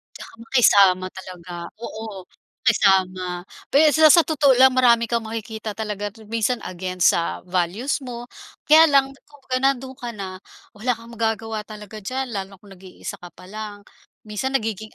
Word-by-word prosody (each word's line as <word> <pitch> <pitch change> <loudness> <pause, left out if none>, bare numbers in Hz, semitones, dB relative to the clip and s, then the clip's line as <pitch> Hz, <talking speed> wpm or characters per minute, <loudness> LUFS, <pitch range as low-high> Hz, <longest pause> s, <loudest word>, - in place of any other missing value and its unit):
'Tsaka - - -11
makisama 195 -7 +4
talaga. 180 -2 -10 0.3
Oo. 215 -5 -7 0.4
Makisama 185 -5 +2 0.3
pe 305 +2 +6
sa 315 +1 +5
sa 330 +2 +7
totoo 290 -4 +3
lang 260 +1 +7
marami 240 -2 +3
kang 235 -1 0
makikita 220 -1 -6
talaga 205 -1 -4 0.2
minsan 230 +2 0
against 185 0 +1
sa 170 - -2
values 185 - -1
mo, 240 0 -8 0.4
kaya 320 +1 +9
lang 275 -2 +3 0.2
kung 290 -1 -20
ga 255 - +2
nandoon 265 -1 0
ka 240 -1 -5
na, 190 -2 -7 0.3
wala 240 +4 -2
kang 230 +1 -14
magagawa 225 -1 -3
talaga 210 0 -10
diyan 255 +5 -4
lalo 195 -2 -5
na 190 - -18
kung 200 - -16
nag-iisa 190 -1 -9
ka 175 0 -13
pa 185 0 -15
lang. 210 -1 -7 0.4
Minsan 215 +5 -4
nagiging 220 -4 -2
220 Hz, 160 wpm, -22 LUFS, 195-250 Hz, 0.4 s, kaya